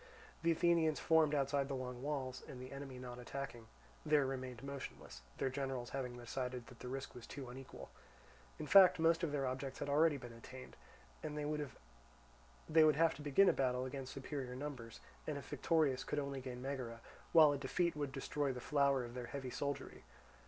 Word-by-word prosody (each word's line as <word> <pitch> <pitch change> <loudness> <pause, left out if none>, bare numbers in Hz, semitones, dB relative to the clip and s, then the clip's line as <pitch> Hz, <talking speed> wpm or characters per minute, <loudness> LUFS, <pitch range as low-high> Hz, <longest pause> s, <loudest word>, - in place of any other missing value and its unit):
The 165 - +2
Athenians 165 -2 +3
formed 160 -2 +4
outside 140 0 +1
the 140 - -2
long 125 -1 -5
walls 135 -3 -3
and, 125 - -8
the 130 0 -8
enemy 135 -2 -7
not 125 -1 -7
attacking, 125 -2 -6 0.4
there 150 -2 +4
remained 130 -2 -4
motionless; 140 - -7 0.2
their 130 - 0
generals 130 -2 -3
having 125 -3 -3
decided 125 0 -4
that 125 -1 -14
the - - -7
risk 135 +2 -5
was 120 - -10
too 135 -2 -7
unequal. 130 +1 -9 0.7
In - - -4
fact 185 +2 +8
most 165 +1 +4
of 165 -4 0
their 140 -2 0
objects 130 +1 -3
had - - -3
been 140 - -1
already 155 +1 +5
attained; 125 0 -9 0.5
and 150 -1 -4
they 150 - -2
would 65 - -1
have 165 +2 +4
to 140 - -10
begin 150 +7 +5
a - - +6
battle 125 -1 +1
against 135 0 -5
superior 135 -2 -4
numbers, 130 -5 -6 0.3
and - - -1
if - - -8
victorious 150 -6 +2
could - - -3
only 140 -2 -2
gain 125 -1 -6
Megara, 130 -4 -4 0.3
while 155 -3 +8
a 145 - 0
defeat 170 +5 0
would 145 -2 -2
destroy 140 +1 -1
the 125 - -5
flower 140 -2 +2
of 120 - -9
their 125 -1 -5
heavy 130 0 -5
soldiery. 140 +2 -4
135 Hz, 190 wpm, -38 LUFS, 125-150 Hz, 0.7 s, fact